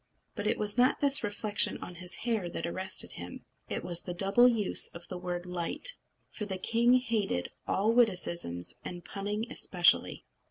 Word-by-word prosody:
But 205 -1 -4
it 220 - +1
was 210 +3 -1
not 250 +1 +3
this 280 -3 +5
reflection 205 0 +2
on 180 - -9
his 180 -1 -3
hair 220 -7 -1
that - - -5
arrested 185 +2 -2
him; - - -9 0.2
it - - -4
was 175 -1 +1
the 180 - -7
double 200 +7 +5
use 225 -5 +3
of 170 +1 -10
the 185 - -6
word 175 0 -5
light. 180 - -2 0.4
For 210 - -6
the 190 -2 -4
king 235 +6 +3
hated 220 - -1 0.2
all 210 +4 +1
witticisms, 175 - +1
and 175 -1 -8
punning 205 +2 -4
especially. 175 -1 +2
200 Hz, 170 wpm, -29 LUFS, 180-230 Hz, 0.4 s, this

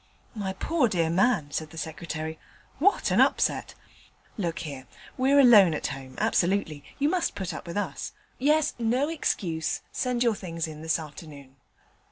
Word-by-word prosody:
'My 200 -4 -3
poor 300 - +1
dear 170 -6 0
man,' 185 -5 +2
said 155 +1 -3
the 165 - -13
Secretary, 160 0 -5 0.4
'what 395 +7 +3
an - - +5
upset! - - +1 0.6
Look 175 -7 -2
here: 135 -3 -7 0.3
we're 270 +2 +4
alone 210 - +7
at - - -4
home, 135 -2 -6
absolutely. 185 -7 +1
You 285 - +2
must 345 +1 0
put 185 -3 -4
up 155 - -8
with 170 - -5
us. 205 - -3 0.3
Yes! 300 +3 +3
no 245 +6 +1
excuse: 175 - -1
send 250 -1 0
your 235 -2 +3
things 165 -5 -4
in 155 -1 -9
this 160 0 +1
afternoon.' 145 -3 -10
180 Hz, 160 wpm, -27 LUFS, 160-245 Hz, 0.6 s, alone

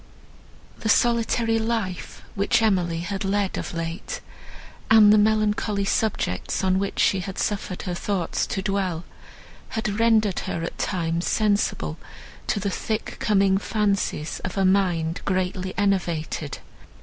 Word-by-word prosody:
The 220 - -2
solitary 230 -1 +2
life, 220 -5 -3
which 200 +2 +2
Emily 175 -6 +1
had 195 +3 -3
led 195 0 0
of - - -4
late, 165 0 -4 0.7
and 215 -1 +8
the - - +6
melancholy 210 -1 +1
subjects, 195 - -1
on 185 0 +2
which 200 0 -3
she 195 - +3
had 190 +1 -6
suffered 195 -3 -2
her 180 - -3
thoughts 180 0 -1
to 195 - -3
dwell, 190 -4 -1 0.7
had 220 -2 -2
rendered 220 -4 +3
her 165 - -2
at 165 - -6
times 170 -2 -1
sensible 210 -1 0 0.5
to - - 0
the 200 0 -2
'thick 215 +3 -3
coming 195 -2 +3
fancies' 200 -7 -1
of 180 +1 -4
a 195 - +3
mind 180 -3 +1
greatly 185 0 -1
enervated. 170 -7 -1
195 Hz, 135 wpm, -24 LUFS, 180-215 Hz, 0.7 s, and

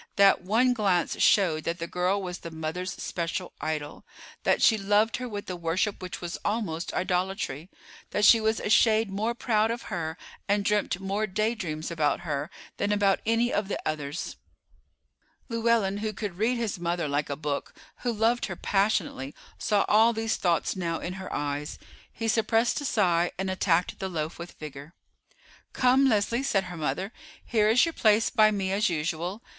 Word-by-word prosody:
That 200 0 +5
one 230 +7 +3
glance 195 -7 +1
showed 165 -6 +4
that 170 +1 -1
the 170 - -4
girl 180 +3 0
was 180 -1 -5
the 170 - -7
mother's 160 +3 -4
special 175 +1 -4
idol; 155 -2 -4 0.4
that - - +2
she 225 - +5
loved 210 +2 +2
her 250 0 -5
with 205 -2 -6
a 185 - -4
worship 175 +4 -1
which 180 -1 -6
was 175 0 -5
almost 205 -6 -2
idolatry, 180 -4 -2 0.4
that 210 - +1
she 225 +1 +7
was 220 0 +1
a - - -3
shade 220 -1 +4
more 220 +4 -1
proud 220 -2 +1
of 235 +1 -5
her 160 -1 -3 0.3
and 205 0 +1
dreamt 210 -3 +1
more 200 +3 -1
daydreams 190 -7 -2
about 155 -2 +1
her 150 -2 -3 0.3
than 205 - 0
about 200 -2 +3
any 230 +2 +2
of 205 -1 0
the - - -2
others. 150 +1 -4 1.1
Llewellyn, 230 -4 +1
who 215 +1 -3
could 195 -3 -5
read 240 +3 +2
his 225 -6 -2
mother 170 -1 -1
like 145 +1 -1
a 140 - -2
book, 145 -1 -3 0.3
who 245 - -2
loved 230 +2 +1
her 180 - -5
passionately, 195 -9 0 0.2
saw 205 -2 +2
all 225 +2 +5
these 225 0 -1
thoughts 170 0 0
now 170 -3 -2
in 180 - -4
her 190 0 -7
eyes. 145 0 -3 0.3
He 225 - -4
suppressed 225 +4 +2
a - - -4
sigh, 175 -8 +2
and 190 0 -2
attacked 180 -2 +1
the 190 - -3
loaf 160 -2 -4
with 170 +1 -8
vigor. 150 +1 -10 0.8
"Come, 260 +2 +4
Leslie," 225 +2 +1
said 200 -8 +1
her 180 -2 -8
mother, 160 - -2 0.3
"here 215 -3 +2
is 240 +7 +5
your 330 - -3
place 215 -3 +3
by 215 -3 +5
me 195 -3 -1
as 205 +2 +2
usual. 170 +5 -3
195 Hz, 180 wpm, -27 LUFS, 170-220 Hz, 1.1 s, she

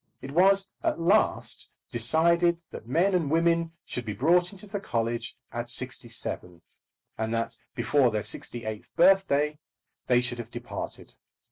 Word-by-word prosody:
It 135 - -8
was 195 +4 +4
at - - 0
last 195 +6 +2 0.2
decided 170 +8 +3
that 110 - -9
men 175 +10 +2
and 170 -6 +1
women 165 +1 +2
should 125 - -4
be 110 -2 -4
brought 175 - +3
into 200 0 -10
the 205 0 -4
college 115 - -2
at - - -4
sixty - - -1
seven, 90 -1 -5 0.6
and 110 0 -1
that 115 0 -2 0.2
before 140 -4 +3
their 105 -2 -2
sixty 115 +1 -3
eighth 110 -1 -6
birthday 165 -5 +4 0.5
they 125 -1 +5
should 125 -1 -1
have 115 -1 -6
departed. 120 0 -7
150 Hz, 150 wpm, -27 LUFS, 120-175 Hz, 0.6 s, they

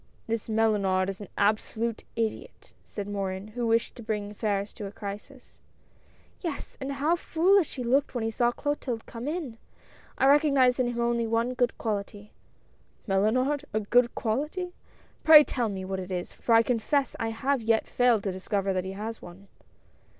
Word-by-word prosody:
" - - -35
This 230 0 -2
Mellunard 200 -4 +2
is 195 - -11
an 205 - -7
absolute 220 +2 0
idiot," 225 -1 -4
said 205 -1 -6
Morin, 195 0 -4
who 235 +2 -3
wished 230 0 +1
to - - -8
bring 210 -2 -3
affairs 205 -1 -2
to 205 - -6
a - - -8
crisis. 210 +6 -9 0.4
" - - -32
Yes, 330 -6 -5
and 275 +1 -3
how 295 +5 +2
foolish 350 +1 +2
he 255 - -4
looked 265 +3 +1
when 240 - -1
he 225 - -1
saw 240 +2 +2
Clo 290 +4 -1
tilde 245 -6 -5
come 235 +3 -7
in. 300 -8 -4 0.6
I - - +2
recognize 275 -3 +4
in 250 - +2
him 240 -1 -3
only 235 -1 +1
one 230 +2 0
good 245 -1 0
quality." 205 -1 -4 0.4
" - - -36
Mellunard! 250 +9 +1
a - - +3
good 240 +3 +2
quality? 300 +11 -2 0.5
Pray 310 -1 +10
tell 240 -5 -1
me 190 -2 -5
what 190 0 -3
it 185 0 -6
is, 180 -1 -4
for 230 - +1
I 225 - +6
confess 250 +3 0
I 225 - -1
have 255 +4 0
yet 225 0 +2
failed 245 -4 +2
to 195 - -1
discover 195 +1 -1
that 185 0 -1
he 190 - -5
has 215 +3 -6
one." 185 +3 -13
230 Hz, 185 wpm, -27 LUFS, 205-255 Hz, 0.6 s, Pray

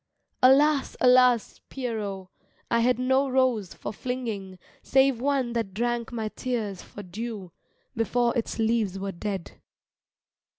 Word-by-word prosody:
Alas, 280 +2 +4
alas, 250 -2 +4
Pierrot, 210 -7 -4 0.4
I 235 - +3
had 245 +1 +3
no 265 +2 +2
rose 255 -7 +1
for - - -6
flinging 215 -6 -4 0.2
Save 265 -2 +3
one 265 -3 0
that 225 -5 -3
drank 240 +1 -1
my 220 -2 -3
tears 215 -6 -3
for 205 - -10
dew 200 0 -6 0.4
Before 235 +2 +1
its 235 - -2
leaves 220 -4 +1
were 195 0 -3
dead. 190 0 -6
235 Hz, 125 wpm, -26 LUFS, 205-255 Hz, 0.4 s, Alas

